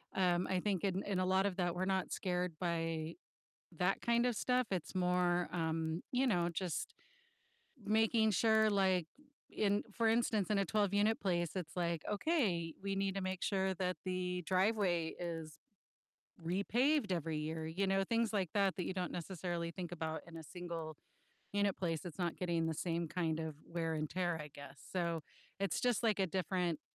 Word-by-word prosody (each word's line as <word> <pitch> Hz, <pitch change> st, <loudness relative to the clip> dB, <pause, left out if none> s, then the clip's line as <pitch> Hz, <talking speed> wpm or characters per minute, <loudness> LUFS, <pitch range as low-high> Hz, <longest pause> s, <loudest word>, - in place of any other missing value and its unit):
um, 180 Hz, -2 st, +2 dB
I 185 Hz, -1 st, +2 dB
think 195 Hz, -2 st, 0 dB
in 195 Hz, 0 st, 0 dB
in 195 Hz, -2 st, -1 dB
a 185 Hz, -, +2 dB
lot 190 Hz, +1 st, +3 dB
of 195 Hz, -1 st, -3 dB
that, 175 Hz, -1 st, 0 dB
we're 185 Hz, +1 st, 0 dB
not 190 Hz, -1 st, 0 dB
scared 180 Hz, -2 st, -1 dB
by 165 Hz, -2 st, -1 dB, 0.6 s
that 180 Hz, +2 st, +2 dB
kind 235 Hz, +1 st, +3 dB
of 240 Hz, -3 st, +1 dB
stuff, 250 Hz, +2 st, +2 dB
it's 185 Hz, -2 st, -2 dB
more, 180 Hz, -1 st, +2 dB
um, 160 Hz, -1 st, -1 dB
you 260 Hz, +2 st, +3 dB
know, 175 Hz, -6 st, +2 dB
just 175 Hz, -2 st, -2 dB, 0.9 s
making 220 Hz, +1 st, +4 dB
sure, 220 Hz, +1 st, +4 dB
like, 190 Hz, -4 st, +3 dB, 0.4 s
in, 205 Hz, -1 st, +1 dB
for 230 Hz, -1 st, +3 dB
instance, 220 Hz, -3 st, +2 dB
in 205 Hz, -, +3 dB
a 195 Hz, -, +2 dB
12-unit 205 Hz, +1 st, +2 dB
place, 175 Hz, -4 st, +1 dB
it's 160 Hz, -4 st, -4 dB
like, 170 Hz, -2 st, 0 dB
"Okay, 200 Hz, -, +1 dB
we 195 Hz, 0 st, -1 dB
need 195 Hz, 0 st, 0 dB
to 195 Hz, -, -1 dB
make 185 Hz, -1 st, -3 dB
sure 190 Hz, -1 st, +1 dB
that 180 Hz, 0 st, -1 dB
the 180 Hz, -1 st, -1 dB
driveway 185 Hz, -4 st, +2 dB
is 165 Hz, -2 st, -5 dB, 0.9 s
repaved 225 Hz, -, +2 dB
every 165 Hz, -3 st, -1 dB
year," 160 Hz, +1 st, -3 dB
you 190 Hz, +4 st, 0 dB
know, 195 Hz, 0 st, +3 dB
things 230 Hz, +1 st, +1 dB
like 190 Hz, -5 st, +1 dB
that, 195 Hz, -2 st, +3 dB
that 180 Hz, -, -2 dB
you -, -, -2 dB
don't 180 Hz, -2 st, -2 dB
necessarily 170 Hz, -1 st, -3 dB
think 175 Hz, -1 st, -6 dB
about 160 Hz, -1 st, -3 dB
in 165 Hz, -, -11 dB
a 160 Hz, -, -8 dB
single-unit 165 Hz, -2 st, -7 dB, 0.6 s
place 165 Hz, -4 st, -1 dB
that's 175 Hz, -1 st, -8 dB
not 175 Hz, -2 st, 0 dB
getting 170 Hz, -2 st, 0 dB
the 160 Hz, -, -1 dB
same 170 Hz, 0 st, -1 dB
kind 160 Hz, -1 st, -1 dB
of 160 Hz, -2 st, -4 dB
wear 165 Hz, -1 st, -2 dB
and 155 Hz, -1 st, -1 dB
tear, 175 Hz, -2 st, 0 dB
I 150 Hz, -, -6 dB
guess, 140 Hz, -1 st, -10 dB
so 170 Hz, -3 st, 0 dB, 0.4 s
it's 195 Hz, -4 st, 0 dB
just, 245 Hz, -2 st, +2 dB
like, 215 Hz, -3 st, +2 dB
a 190 Hz, -, +3 dB
different 180 Hz, -2 st, -1 dB
180 Hz, 180 wpm, -36 LUFS, 170-200 Hz, 0.9 s, making